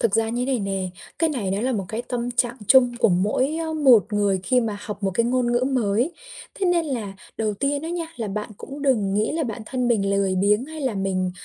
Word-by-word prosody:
Thực 225 Hz, -4 st, +2 dB
ra 225 Hz, 0 st, +2 dB
như 245 Hz, +2 st, -1 dB
thế 270 Hz, -, 0 dB
này 250 Hz, -, 0 dB
nè, 195 Hz, -2 st, -2 dB, 0.3 s
cái 325 Hz, 0 st, +2 dB
này 225 Hz, -10 st, -2 dB
nó 195 Hz, +2 st, -1 dB
là 255 Hz, +3 st, 0 dB
một 200 Hz, -5 st, -2 dB
cái 220 Hz, +4 st, -3 dB
tâm 245 Hz, -1 st, -3 dB
trạng 240 Hz, 0 st, 0 dB
chung 245 Hz, -3 st, +6 dB
của -, -, +4 dB
mỗi, 210 Hz, -, +1 dB
ơ, 325 Hz, -1 st, -3 dB
một 255 Hz, -, +5 dB
người 200 Hz, -2 st, +1 dB
khi 250 Hz, +6 st, +3 dB
mà 215 Hz, -3 st, -3 dB
học 210 Hz, 0 st, -7 dB
một 195 Hz, -, +1 dB
cái 230 Hz, -, +2 dB
ngôn 245 Hz, -1 st, +1 dB
ngữ 240 Hz, +1 st, +2 dB
mới. 240 Hz, -, +1 dB, 0.4 s
Thế 390 Hz, -, -1 dB
nên 345 Hz, -2 st, +2 dB
là 230 Hz, -8 st, -3 dB, 0.2 s
đầu 215 Hz, -2 st, -1 dB
tiên 280 Hz, +6 st, -1 dB
á 325 Hz, -, -4 dB
nha, 340 Hz, -1 st, -3 dB
là 225 Hz, -3 st, -3 dB
bạn 210 Hz, +2 st, -4 dB
cũng 280 Hz, +1 st, -8 dB
đừng 215 Hz, -9 st, +2 dB
nghĩ 210 Hz, +2 st, +1 dB
là 320 Hz, +1 st, -1 dB
bản 230 Hz, -4 st, -4 dB
thân 250 Hz, -1 st, -1 dB
mình 200 Hz, -4 st, +2 dB
lười 200 Hz, -1 st, +1 dB
biếng 205 Hz, +5 st, +2 dB
hay 315 Hz, +2 st, -8 dB
là 260 Hz, -5 st, -1 dB
mình, 190 Hz, -2 st, -1 dB
235 Hz, 255 wpm, -23 LUFS, 200-265 Hz, 0.4 s, chung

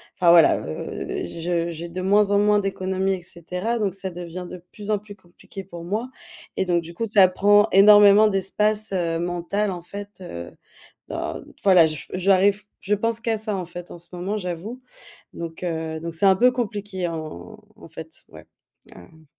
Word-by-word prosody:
enfin, 175 Hz, -2 st, +3 dB
voilà. 170 Hz, -1 st, +6 dB
Heu, 80 Hz, -, -5 dB
je 170 Hz, -, -2 dB
j'ai 170 Hz, +1 st, -6 dB
de 185 Hz, +2 st, -5 dB
moins 205 Hz, +2 st, +3 dB
en 200 Hz, -, +4 dB
moins 210 Hz, 0 st, +4 dB
d'économies 190 Hz, -1 st, -1 dB
et 180 Hz, -, -9 dB
cetera, 180 Hz, +7 st, -4 dB
donc 200 Hz, -4 st, -1 dB
ça 195 Hz, -1 st, -4 dB
devient 175 Hz, 0 st, -7 dB
de 180 Hz, -1 st, -10 dB
plus 210 Hz, 0 st, -10 dB
en 210 Hz, -, +1 dB
plus 205 Hz, 0 st, -13 dB
compliqué 185 Hz, +2 st, -12 dB
pour 170 Hz, -2 st, -9 dB
moi 215 Hz, +8 st, -3 dB, 0.5 s
et -, -, 0 dB
donc 175 Hz, -2 st, +1 dB
du 170 Hz, +1 st, -11 dB
coup, 230 Hz, +6 st, -3 dB
ça 200 Hz, -3 st, +6 dB
prend 205 Hz, +3 st, +4 dB
énormément 205 Hz, +1 st, +7 dB
d'espace, 210 Hz, +2 st, 0 dB
heu, 170 Hz, -2 st, -1 dB
mental, 175 Hz, +4 st, -2 dB
en 180 Hz, -2 st, -5 dB
fait, 200 Hz, +3 st, -8 dB
heu, 85 Hz, -, -8 dB, 0.6 s
dans -, -, -4 dB, 0.2 s
voilà. 185 Hz, -4 st, +6 dB
J 155 Hz, -2 st, -5 dB
j'arrive 195 Hz, +2 st, +3 dB, 0.2 s
je 205 Hz, +2 st, +1 dB
pense 230 Hz, +2 st, -1 dB
qu'à 230 Hz, -1 st, -1 dB
ça, 215 Hz, -2 st, -3 dB
en 180 Hz, -, -4 dB
fait, 175 Hz, +1 st, -9 dB
en -, -, -9 dB
ce 170 Hz, 0 st, -13 dB
moment, 190 Hz, +4 st, -3 dB
j'avoue, 190 Hz, +6 st, -6 dB, 0.5 s
donc 165 Hz, +1 st, -7 dB
heu, 160 Hz, -2 st, -3 dB
donc 170 Hz, 0 st, -5 dB
c'est 165 Hz, -, 0 dB
un 190 Hz, -, +6 dB
peu 250 Hz, +5 st, +5 dB
compliqué, 205 Hz, -6 st, -3 dB
en 155 Hz, -, -7 dB, 0.2 s
en -, -, -14 dB
fait, -, -, -10 dB
ouais. -, -, -14 dB, 0.5 s
Ah, 95 Hz, -, -13 dB
hem. 160 Hz, -, -20 dB
190 Hz, 190 wpm, -23 LUFS, 170-205 Hz, 0.6 s, énormément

